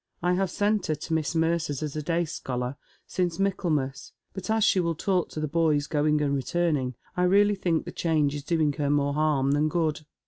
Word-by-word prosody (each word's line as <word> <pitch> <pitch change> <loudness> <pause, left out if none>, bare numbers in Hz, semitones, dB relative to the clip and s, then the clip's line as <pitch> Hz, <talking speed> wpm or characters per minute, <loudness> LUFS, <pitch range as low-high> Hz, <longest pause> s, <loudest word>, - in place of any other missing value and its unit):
I 180 0 +3
have 190 +1 +1
sent 205 +1 0
her 155 - +1
to 155 +2 -5
Miss 160 +1 0
Mercer's 160 -3 0
as 150 -1 -4
a 155 - -2
day 170 +3 0
scholar, 125 -3 -4 0.3
since 175 -3 -1
Michaelmas, 160 -9 -1 0.2
but 190 0 -7
as 220 0 +2
she 195 - +4
will 170 -2 0
talk 180 +1 0
to - - -6
the 155 - -1
boys 150 -2 +2
going 150 0 +1
and 140 -1 +1
returning, 140 -3 0 0.2
I 180 - 0
really 205 +3 +4
think 175 -5 0
the - - -6
change 155 -4 +1
is 145 -1 -5
doing 155 -2 +1
her 145 -1 +1
more 145 0 +2
harm 145 -3 +2
than 150 +2 +2
good. 160 -3 0
160 Hz, 210 wpm, -26 LUFS, 145-175 Hz, 0.3 s, she